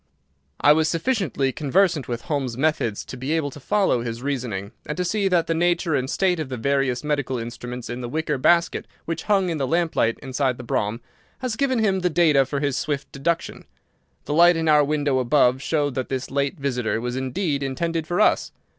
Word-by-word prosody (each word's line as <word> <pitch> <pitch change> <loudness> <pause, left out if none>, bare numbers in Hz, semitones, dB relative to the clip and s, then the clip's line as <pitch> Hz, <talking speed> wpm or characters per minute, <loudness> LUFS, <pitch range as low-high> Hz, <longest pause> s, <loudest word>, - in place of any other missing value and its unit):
I 145 - +6
was 160 +1 +2
sufficiently 165 - 0
conversant 155 +1 +1
with 120 -1 -4
Holmes's 135 -6 -2
methods 135 -7 0
to - - -8
be 130 +5 -3
able 155 -3 0
to 145 - -11
follow 190 - +1
his 115 +1 -5
reasoning, 120 -8 -3 0.2
and 150 - -4
to 180 - 0
see 200 +2 +1
that 175 -3 +2
the 165 - 0
nature 170 0 +1
and 130 -2 0
state 180 0 +1
of 155 -4 -4
the 130 - -4
various 135 0 0
medical 145 -3 -1
instruments 120 +1 -6
in 120 +1 -5
the 120 - -5
wicker 150 0 -1
basket 170 +5 +2 0.2
which 165 - -4
hung 195 -3 +2
in 160 - -3
the 135 - 0
lamplight 160 -7 +1
inside 130 -1 -1
the 125 - -8
brougham 110 0 -1 0.4
had 255 -4 -3
given 265 0 +1
him 200 -4 +2
the 180 -1 +1
data 155 -5 +4
for 140 0 -2
his 140 -2 0
swift 145 -2 -3
deduction. 160 +4 -2 0.6
The - - -2
light 170 +2 +6
in 165 0 -1
our 150 -1 +6
window 145 -2 +1
above 130 0 +3
showed 145 -2 0
that 130 0 -3
this 130 -1 -3
late 140 +4 -1
visit 125 -4 -2
was 120 +1 -3
indeed 140 +3 -1
intended 160 +4 -2
for 175 +4 -1
us. 215 - +3
145 Hz, 205 wpm, -23 LUFS, 130-165 Hz, 0.6 s, I